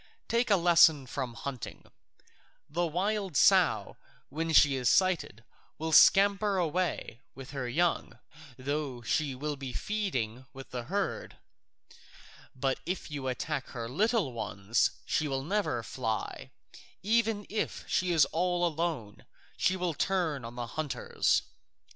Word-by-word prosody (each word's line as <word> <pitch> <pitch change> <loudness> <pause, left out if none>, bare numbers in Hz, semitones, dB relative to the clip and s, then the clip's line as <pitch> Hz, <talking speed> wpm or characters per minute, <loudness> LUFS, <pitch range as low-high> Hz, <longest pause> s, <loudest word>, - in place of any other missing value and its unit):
Take 235 +1 +1
a 205 - +6
lesson 170 -5 +5
from 125 -1 -5
hunting: 130 0 -7 0.8
the 170 +3 -1
wild 190 0 -1
sow - - +4 0.3
when 165 +3 -2
she 145 -3 +6
is 125 -2 +1
sighted 180 - +1 0.3
will 160 +1 -3
scamper 200 +4 +5
away 170 -7 -1
with 135 -1 -10
her 135 -4 -4
young, 170 +7 0 0.4
though 135 -2 -3
she 140 +2 0
be 140 -1 -5
feeding 130 - -3
with 135 0 -11
the 125 -2 -5
herd; 195 +6 -3 1.2
but 135 +1 -1
if 180 -3 -4
you 140 -3 -4
attack 135 +2 -3
her 115 -2 -6
little 200 - +1
ones 105 0 0 0.2
she 155 - 0
will 135 -1 -2
never 185 - -1
fly, 110 -2 -4 0.5
even 220 -1 +1
if 215 +1 -3
she 180 0 +1
is 160 -5 +5
all 175 +1 +1
alone; 155 -10 -3 0.3
she 185 - +1
will 180 -2 -1
turn 160 -5 -1
on 115 +1 -8
the 120 -1 -4
hunters. 150 +4 0
155 Hz, 130 wpm, -30 LUFS, 130-185 Hz, 1.2 s, a